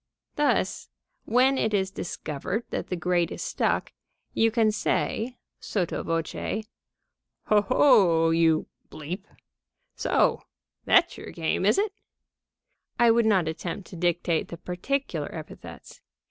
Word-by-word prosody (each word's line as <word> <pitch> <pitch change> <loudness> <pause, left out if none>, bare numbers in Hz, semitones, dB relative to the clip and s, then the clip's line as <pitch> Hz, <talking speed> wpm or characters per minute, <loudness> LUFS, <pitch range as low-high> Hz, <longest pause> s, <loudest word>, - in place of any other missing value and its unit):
Thus, 295 0 0 0.4
when 260 +3 +3
it 220 -1 +1
is 190 -1 0
discovered 180 - -4
that - - -3
the 180 - -2
grate 175 0 +1
is - - -6
stuck, - - -1 0.4
you 225 - +3
can 225 -1 +2
say, 235 +3 -1 0.2
sotto 180 -5 -2
voce: 165 +6 -3 0.8
"Ho, 210 -1 +4
ho! 185 - +4
you! 165 -1 +3 1.3
So - - +2 0.4
that's 350 -2 +4
your - - -8
game, 170 +3 -1
is 210 - +4
it?" 410 0 0 1.0
(I 235 -1 +5
would 230 -1 +3
not 190 -6 +3
attempt 170 +4 -4
to - - -8
dictate 175 -1 0
the 170 - -8
particular 265 - -3
epithets. - - -10
195 Hz, 120 wpm, -26 LUFS, 170-230 Hz, 1.3 s, I